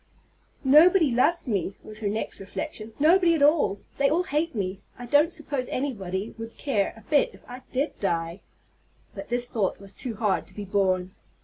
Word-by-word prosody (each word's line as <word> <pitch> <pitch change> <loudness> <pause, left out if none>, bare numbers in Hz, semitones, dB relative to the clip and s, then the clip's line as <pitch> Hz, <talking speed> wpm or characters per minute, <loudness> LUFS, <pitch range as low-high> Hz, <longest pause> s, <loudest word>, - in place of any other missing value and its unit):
"Nobody 310 +3 +6
loves 280 +7 +2
me," 195 -4 -1
was 215 0 -8
her 215 - -2
next 215 +2 -3
reflection, 215 +2 -6
"nobody 335 +3 +5
at 295 - +1
all. 290 -9 +3 0.2
They 280 0 +4
all 335 +5 +2
hate 320 -3 -1
me. 190 -1 -3 0.2
I 245 - -7
don't 290 +6 +4
suppose 285 -6 -3
anybody 205 -7 -3
would 225 0 -8
care 215 -9 0
a 225 - -17
bit 295 -2 +3
if - - -17
I 250 +1 -9
did 275 +4 -2
die." 170 -1 -2 0.7
But - - -8
this 240 0 +1
thought 210 -6 -1
was 195 0 -12
too 240 -4 -4
hard 210 -3 0
to - - -16
be 205 - -6
borne. 185 -2 0
240 Hz, 185 wpm, -26 LUFS, 200-295 Hz, 0.7 s, Nobody